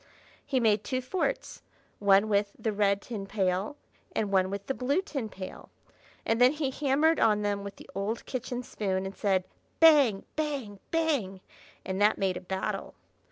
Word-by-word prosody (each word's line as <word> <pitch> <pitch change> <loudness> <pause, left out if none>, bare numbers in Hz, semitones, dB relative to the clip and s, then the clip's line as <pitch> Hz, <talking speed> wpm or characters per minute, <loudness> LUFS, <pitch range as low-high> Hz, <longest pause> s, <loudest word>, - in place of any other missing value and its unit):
He 275 -2 0
made 215 -3 +3
two 255 +5 -1
forts, 260 +9 -2 0.4
one 200 +1 +5
with 205 -1 +1
the 220 - -2
red 200 -1 +2
tin 210 -5 -6
pail 195 +4 0 0.4
and 210 -2 0
one 190 -1 +3
with 200 0 -5
the 270 - -1
blue 265 +6 0
tin 275 - -4
pail; 185 -2 -9 0.6
and 225 +2 +1
then 250 +3 +7
he 295 -3 -1
hammered 295 +4 +2
on 210 -2 +3
them 205 -1 -1
with 200 0 -7
the - - -14
old 205 +4 -3
kitchen 250 -1 -4
spoon 190 -4 -2
and 190 - -6
said, 190 -3 +1 0.4
"Bang! 285 -11 +6
bang! 275 -10 -3
bang!" 285 - 0 0.5
and 190 +1 -2
that 210 +1 +4
made 190 -2 0
a 180 - -5
battle. 190 +1 -4
210 Hz, 170 wpm, -29 LUFS, 195-260 Hz, 0.6 s, then